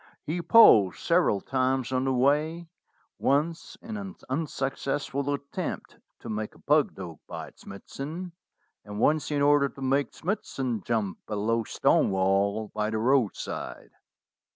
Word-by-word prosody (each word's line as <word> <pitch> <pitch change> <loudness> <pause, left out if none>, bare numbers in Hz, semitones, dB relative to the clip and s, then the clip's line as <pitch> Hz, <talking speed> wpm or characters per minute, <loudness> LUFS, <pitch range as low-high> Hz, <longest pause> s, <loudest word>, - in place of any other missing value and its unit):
He 165 +4 -2
paused 110 - +7
several 170 - +2
times 130 -1 0
on 130 0 0
the 135 - +1
way, 150 +6 +1 0.5
once 155 +4 0
in 220 -1 -6
an 200 -1 -7
unsuccessful 140 -1 -2
attempt 140 0 -5 0.2
to - - -9
make 110 0 -4
a - - -18
pug 150 0 +2
dog 85 -5 -8
bite - - -8
Smithson, 155 - -7 0.5
and 105 0 -7
once 155 +5 +2
in 145 -1 +1
order 145 -1 +4
to 135 - -13
make 135 +2 0
Smithson 135 - -3
jump 110 -4 -2
a 105 - -3
low 115 +3 0
stone - - +2
wall 100 +3 +1
by 105 0 -1
the 110 - -2
roadside. 120 -1 -1
135 Hz, 140 wpm, -27 LUFS, 110-150 Hz, 0.5 s, paused